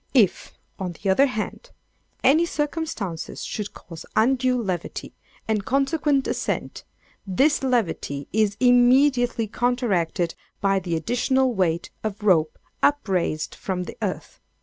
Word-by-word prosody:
If, 210 -8 +3 0.3
on 180 -2 -3
the 195 +3 -1
other 275 +9 +5
hand, 250 - -5 0.5
any 300 +6 +5
circumstances 295 - -3
should 210 -1 -4
cause 165 -2 -10
undue 255 +2 +3
levity, 185 -7 -4 0.3
and 215 -2 0
consequent 275 +2 +1
ascent, - - -3 0.4
this 270 +11 +2
levity 215 - -1
is 210 -1 +2
immediately 245 -1 +4
counteracted 210 -8 0 0.3
by 195 -1 +2
the 175 -2 -3
additional 250 - +1
weight 170 -4 0
of 215 -1 -4
rope 165 -6 +3 0.2
upraised 190 - +1
from 185 -2 -3
the - - -8
earth. - - -4
220 Hz, 120 wpm, -24 LUFS, 185-260 Hz, 0.5 s, other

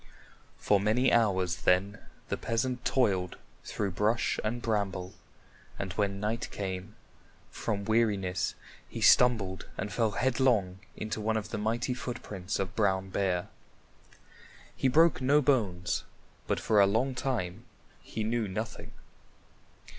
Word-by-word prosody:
For 105 - +2
many 110 +6 +2
hours 95 -6 +2
then 100 +3 +1 0.3
the - - 0
peasant 125 +2 -2
toiled 95 -9 +1 0.3
through 100 -2 -2
brush 105 +6 +1
and 110 +3 -1
bramble, 100 -5 -2 0.6
and 95 -2 -4
when 100 -1 -1
night 110 +3 -2
came, 95 -2 -5 0.6
from 100 -3 -3
weariness 105 -5 +1 0.3
he - - -6
stumbled 110 -7 +4
and 105 - -4
fell 115 -2 +2
headlong 120 -7 +1 0.2
into 110 0 -4
one 110 +1 0
of 105 - -4
the - - -3
mighty 115 +4 -1
footprints 105 -7 -5
of 95 -1 -3
Brown 95 -3 +1
Bear. 90 -3 0 1.3
He - - +1
broke 160 +3 +4
no 140 +3 +4
bones, 110 -11 +1 0.4
but - - 0
for 105 -2 +3
a 100 - +6
long 115 +7 +1
time 120 -5 -3 0.4
he 110 - -5
knew 115 0 0
nothing. 95 - -5
105 Hz, 130 wpm, -30 LUFS, 95-120 Hz, 1.3 s, a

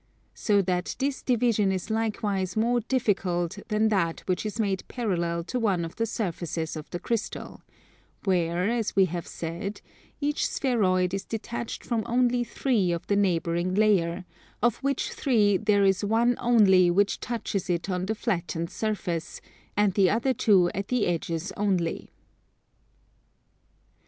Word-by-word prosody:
So 205 -2 +2
that 180 -1 -1
this 275 0 -1
division 230 -5 +2
is 190 +3 -3
likewise 210 -4 -1
more 240 +2 +2
difficult 195 -8 0
than 215 0 +2
that 170 -6 0
which 185 +3 -2
is 215 +2 -6
made 195 -3 0
parallel 170 -8 -1
to 250 +8 -3
one 195 -7 +1
of 165 - -9
the 230 - 0
surfaces 170 -7 -3
of 155 -1 -8
the - - -4
crystal; 220 +4 -4 0.6
where, 180 -1 +1
as 230 -2 -1
we 195 -1 +6
have 175 -1 -5
said, 170 +5 -5 0.4
each 295 0 0
spheroid 185 -8 +1
is 195 - -2
detached 230 +1 -5
from 235 -2 0
only 245 0 +2
three 230 -7 0
of 170 -1 -3
the 200 - +1
neighbouring 175 -2 +1
layer: 190 -4 +2 0.3
of 240 0 +2
which 275 -1 -1
three 210 -7 +2
there 205 +1 +2
is 195 0 +2
one 230 +4 +2
only 200 -7 +5
which 200 +3 +2
touches 215 -5 -3
it 170 0 -1
on 185 -1 -2
the 220 - -1
flattened 175 -6 -2
surface, 195 -7 -3 0.4
and 205 -2 +3
the 190 -1 +4
other 240 +5 +1
two 190 -8 +4
at 195 +1 -3
the 250 -3 +1
edges 170 +1 -2
only. 185 -5 -1
200 Hz, 150 wpm, -27 LUFS, 180-225 Hz, 0.6 s, we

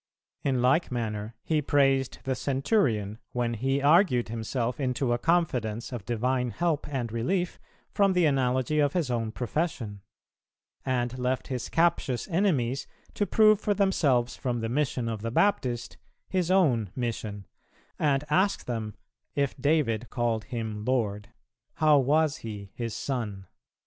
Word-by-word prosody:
In 130 -3 0
like 145 +6 +3
manner 110 -2 -3
He 155 -2 +1
praised 135 -2 +2
the 135 - 0
centurion 125 - 0
when 120 -1 0
he 135 +4 0
argued 145 - +4
himself 115 +2 -2
into 125 -2 0
a 120 - 0
confidence 120 -9 0
of 120 -5 -6
divine 125 +2 0
help 160 +3 -1
and 125 -5 -3
relief 175 - -1 0.3
from 200 -2 +3
the 180 -2 +3
analogy 130 +1 +1
of 145 -1 +2
his 165 -8 0
own 115 -2 -1
profession; 120 - -3 0.8
and 125 -1 -1
left 125 +1 -1
his 125 -2 -3
captious 165 -7 +1
enemies 150 - +1 0.3
to 205 - -1
prove 215 -2 +5
for 205 - +1
themselves 145 -11 +2
from 120 -2 -2
the 115 - -2
mission 130 -2 0
of 110 -2 -3
the 115 - -2
Baptist 125 - 0 0.3
His 180 -2 0
own 135 - +3
mission; 110 -5 -4 0.5
and 145 -2 +2
asked 185 +7 +1
them 110 -4 -4 0.4
"if 140 -1 0
David 125 -7 +1
called 115 -3 -1
Him 110 -4 -4
Lord, 105 -5 -1 0.5
how 155 -2 +5
was 150 +3 +2
He 105 -3 -8
his 115 -2 -4
Son?" 110 -8 -3
125 Hz, 145 wpm, -28 LUFS, 115-150 Hz, 0.8 s, prove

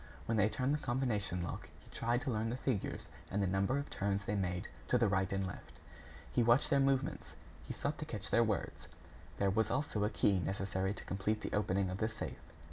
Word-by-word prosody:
When 115 - 0
they 105 0 +4
turned 130 +4 +1
the 150 - +1
combination 115 -9 0
lock, 85 - -5
he - - -18
tried 120 +2 0
to 130 - -1
learn 110 0 0
the 120 - -2
figures 125 -6 -2 0.2
and 100 - -1
the 100 - +3
number 95 +7 +2
of 140 - -2
turns 100 0 0
they 105 - -1
made 90 -3 -1 0.2
to 125 - +4
the 115 -2 +4
right 95 -1 +1
and 95 0 0
left. 95 - -7 0.6
He - - +4
watched 120 +6 +4
their 140 - +5
movements; 135 0 +1 0.3
he - - -3
sought - - -2
to - - -3
catch - - -5
their - - +6
words. - - -2 0.5
There 100 -1 +2
was 110 +2 +2
also 130 -6 0
a 105 - +2
key 100 -3 +3
necessary 95 +1 -1
to - - -8
complete 105 +3 -1
the - - -4
opening 100 -2 +1
of 95 - -4
the 110 - +1
safe. 115 - -6
105 Hz, 220 wpm, -35 LUFS, 95-120 Hz, 0.6 s, their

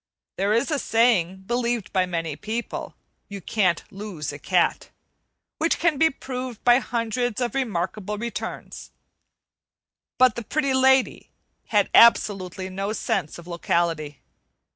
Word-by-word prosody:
There 200 +2 +1
is 235 +8 +1
a 295 - +1
saying, 195 -7 +2
believed 240 -1 -2
by 185 -2 +2
many 165 -4 -3
people, 220 +8 -5 0.3
"You 200 -1 -6
can't 185 -3 0
lose 190 -8 -6
a 145 - -8
cat," 180 +3 +1 0.7
which 325 +1 +1
can 325 -4 +1
be 320 +1 +5
proved 255 -4 -7
by 245 +1 +6
hundreds 240 -1 -2
of 245 -1 -1
remarkable 210 -4 -2
returns. 235 +2 -6 1.3
But 255 -2 +5
the 235 - -5
Pretty 275 +3 0
Lady 265 0 +3 0.4
had - - +2
absolutely 190 -5 +4
no 195 +3 -3
sense 195 -8 -2
of 170 - -12
locality. 165 -4 -1
215 Hz, 130 wpm, -24 LUFS, 185-245 Hz, 1.3 s, by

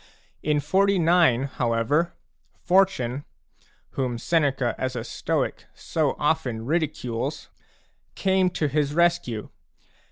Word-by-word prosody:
In 150 -1 +1
49, 170 -4 +3
however, 130 +6 0 0.5
Fortune, 175 -9 +2 0.7
whom 125 -3 -2
Seneca 135 -3 +1
as 130 -1 -3
a 115 - -3
Stoic - - -2
so - - -1
often 115 -2 -1
ridicules, 140 -6 -2 0.7
came 190 -1 +2
to 155 -3 -1
his 145 +1 0
rescue. 170 -11 +1
145 Hz, 95 wpm, -25 LUFS, 125-170 Hz, 0.7 s, 49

